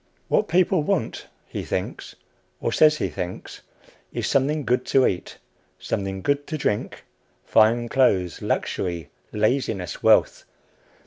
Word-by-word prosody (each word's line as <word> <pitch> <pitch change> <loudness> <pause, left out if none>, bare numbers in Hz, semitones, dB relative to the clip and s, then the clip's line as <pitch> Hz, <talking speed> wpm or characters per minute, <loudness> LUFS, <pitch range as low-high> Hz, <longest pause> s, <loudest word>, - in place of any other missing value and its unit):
What 210 - +2
people 180 0 +3
want, 155 - -2 0.2
he - - -6
thinks, - - -4 0.4
or - - -1
says 155 -1 +5
he 95 - -1
thinks, 90 +2 -6 0.5
is - - -3
something 145 +2 +1
good 125 +1 +1
to 135 -1 +4
eat, 90 - -2 0.4
something 95 -1 -3
good 145 0 0
to 155 - -3
drink, 105 -7 -2 0.4
fine 115 +2 +3
clothes, 100 -9 +1
luxury, 85 -3 -2 0.2
laziness, 105 - -1
wealth. - - +3
125 Hz, 125 wpm, -24 LUFS, 95-150 Hz, 0.5 s, says